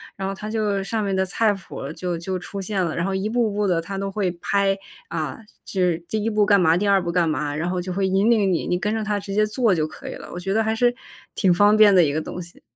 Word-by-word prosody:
然 195 -1 -3
后 195 - -4
它 210 +2 -7
就 210 -3 -1
上 220 +2 -2
面 195 -1 -1
的 190 0 +1
菜 215 +3 +2
谱， 190 -7 -7
就 180 0 -3
就 185 +2 -3
出 195 +2 -6
现 190 -1 -1
了。 165 - -3
然 170 - -1
后 195 +1 -1
一 190 +2 -1
步 230 0 +1
步 205 +1 -1
地 175 -4 +1
它 195 +4 -6
都 195 0 -3
会 195 -2 0
拍， 195 +1 +1 0.3
啊， 155 -5 -4 0.3
就 190 - -2
是 175 -2 +2
第 215 -1 -2
1 225 - +1
步 210 -1 +2
干 200 -2 +4
嘛、 165 -1 +4
第 205 +3 0
2 200 -1 +4
步 170 - -2
干 170 -1 +2
嘛， 145 -1 -1
然 160 +3 -2
后 180 0 -1
就 185 +1 -5
会 195 +2 0
引 195 +4 +2
领 205 -5 +3
你， 170 - -1
你 180 - +1
跟 210 +3 -1
着 220 -1 -1
它 210 -1 -1
直 195 0 -6
接 210 +1 +3
做 215 0 +2
就 155 -3 0
可 155 - -11
以 - - -5
了。 - - -10
我 175 - -6
觉 195 +2 -2
得 220 +1 +2
还 220 0 0
是 245 +1 +3 0.4
挺 190 - +2
方 205 +4 +5
便 215 -2 +7
的 180 - +7
一 145 -3 +1
个 155 - -1
东 175 - -7
西。 175 -1 -11
195 Hz, 310 characters per minute, -23 LUFS, 180-210 Hz, 0.4 s, 便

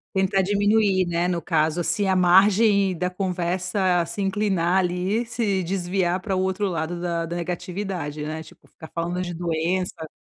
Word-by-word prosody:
Tentar 190 0 +2
diminuir, 205 -1 +2
né, 175 0 0
no 180 -1 0
caso, 160 0 0
assim 175 +4 0
a 190 - +2
margem 195 +1 +4
da 180 +2 -1
conversa 185 0 0
se 185 +4 -3
inclinar 190 -2 +1
ali, 185 +5 0
se 220 -4 0
desviar 180 0 -1
para 190 0 -2
o 185 - +1
outro 190 +2 0
lado 170 -1 -3
da 170 -1 -2
da 170 - -4
negatividade, 175 -3 -4
né. 155 +1 -4
Tipo, 160 - -16
ficar 160 - -12
falando 175 +2 -2
de 175 -1 -4
doença. 170 0 -2
180 Hz, 165 wpm, -24 LUFS, 170-195 Hz, -, margem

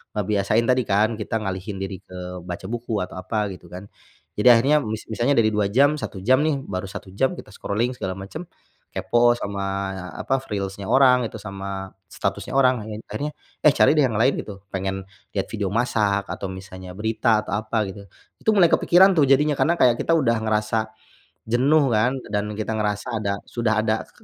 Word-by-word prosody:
ngebiasain 105 +2 +1
tadi 125 0 +3
kan 110 +2 +2
kita 110 +1 -3
ngalihin 95 -1 -4
diri 95 -1 -5
ke 90 -1 -8
baca 90 +1 -6
buku 115 -1 -3
atau 90 0 -5
apa 105 +3 -2
gitu 90 - -12
kan. 95 +3 -8 0.5
Jadi, 105 - +2
akhirnya 135 +6 +4
mis 110 0 -5
misalnya 120 +5 +1
dari 110 - +4
2 105 -1 0
jam, 140 +6 +4
1 105 -8 -6
jam 130 +8 +3
nih 150 -3 +1
baru 95 -1 -3
1 100 +1 -8
jam 135 +6 +2
kita - - -10
scrolling 120 +5 -1
segala 95 -6 -3
macam, 105 - -7 0.5
kepo 120 0 +3
sama, 100 -4 -4 0.5
apa, 135 - 0
reels-nya 100 -5 -5
orang, 125 -2 +5
itu - - -12
sama 100 -1 -6 0.2
statusnya - - -4
orang 130 -3 +4
lain. 110 -1 -6
Akhirnya, 150 +1 -3 0.3
eh, 150 - +7
cari - - +5
deh 150 - +5
yang 115 -4 -2
lain 125 +6 +3
gitu. 100 -2 -8
Pengen 95 0 -3 0.3
lihat 95 - -2
video 105 -3 -2
masak 105 -4 +1
atau 95 - -4
misalnya 95 -1 -9
berita 110 +1 +1
atau 105 - -3
apa 110 0 0
gitu. 100 +1 -10 0.4
Itu 220 - +3
mulai 175 -4 +6
kepikiran 185 +1 +5
tuh 150 - +6
jadinya, 145 +2 +3
karena 170 - +3
kayak 120 -2 +5
kita 165 - +1
udah 115 -7 +2
ngerasa 110 0 0 0.6
jenuh 140 +6 +4
kan 115 +3 +2 0.2
dan 105 0 -1
kita 110 +1 -3
ngerasa 105 +1 -2
ada, 100 -2 -1 0.2
sudah 110 -2 0
ada 110 0 -1
ke - - -25
110 Hz, 190 wpm, -23 LUFS, 100-125 Hz, 0.6 s, eh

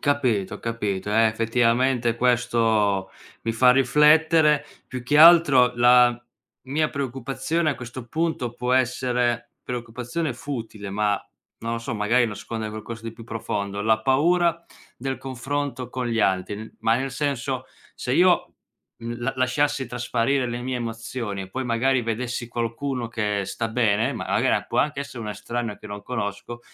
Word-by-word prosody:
Capito, 125 -9 0
capito, 105 -4 -3
eh, 115 0 +5
effettivamente 115 +2 +1
questo 115 -5 +2 0.3
mi 115 - -1
fa 125 +2 +5
riflettere. 150 +3 +4 0.2
Più 130 -2 -6
che 145 +4 +2
altro 155 -6 +7
la 120 0 +5 0.4
mia 150 +4 0
preoccupazione, 140 +5 -2
a - - -2
questo 120 0 -8
punto 160 -4 -2
può 125 +1 -2
essere 125 -2 0
preoccupazione 125 +5 -4
futile 115 -6 -6
ma, 105 +1 +1 0.5
non 115 0 -4
lo - - -2
so, 115 +1 -5
magari 115 +4 +2
nasconde 110 0 -5
qualcosa 110 +2 -7
di 115 -1 -6
più 115 - -12
profondo, 100 -3 -4
la 110 +1 +2
paura 170 +6 +2 0.3
del 130 +1 -4
confronto 135 -1 -4
con 125 0 -3
gli 115 -1 -1
altri, 95 0 +1
n - - -14
ma 115 +1 +3
nel 135 +1 -2
senso, 130 -1 -2 0.3
se 125 - -3
io, 175 +4 +3 0.5
mhmm, 120 +1 -6
la 135 +3 -1
lasciassi 130 +1 +1
trasparire 125 +2 0
le 120 +1 -4
mie 130 0 -2
emozioni, 115 -3 -4
e 95 - -9
poi 130 +5 -3
magari 125 +2 +1
vedessi 120 +1 -3
qualcuno 120 +1 -3
che 105 -3 -1
sta 115 +4 -3
bene, 110 -2 +1
ma - - -6
la - - +2
gara - - +2
può - - -3
anche 145 -2 +1
essere 140 -3 -7
una 105 - -4
estraneo 115 +1 -4
che - - -12
non 100 0 -7
conosco, 115 0 -5
120 Hz, 155 wpm, -24 LUFS, 115-135 Hz, 0.5 s, altro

